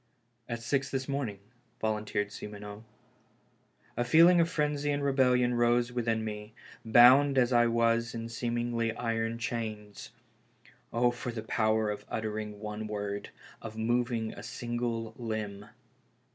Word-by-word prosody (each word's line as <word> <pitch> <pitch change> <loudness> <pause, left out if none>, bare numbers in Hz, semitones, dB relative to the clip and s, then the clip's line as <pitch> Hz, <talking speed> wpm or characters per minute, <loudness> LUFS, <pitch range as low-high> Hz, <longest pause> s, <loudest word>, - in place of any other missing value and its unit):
" 120 0 -37
At 115 -1 -4
six 135 +3 0
this 130 -1 -3
morning," 135 -8 -2 0.4
volunteered 105 -1 -1
Simoneau. 105 0 -8 1.1
A 120 - 0
feeling 165 +8 +6
of 165 - +1
frenzy 150 -2 -1
and 145 0 -1
rebellion 125 -3 +3
rose 120 0 +2
within 115 -2 -1
me, 105 0 -7 0.3
bound 130 +5 +7
as 125 -1 +3
I 120 0 +5
was 115 0 +1
in 115 0 -4
seemingly 115 0 -1
iron 115 -1 -2
chains. 110 -3 -5 0.8
Oh, 120 +1 +3
for 120 0 -5
the 110 -2 -6
power 110 -1 +1
of 105 - -6
uttering 105 -1 -4
one 105 0 -5
word, 100 -1 -4 0.3
of 110 0 -8
moving 115 0 0
a - - -9
single 120 0 -3
limb! 105 -3 -4
115 Hz, 135 wpm, -30 LUFS, 110-120 Hz, 1.1 s, bound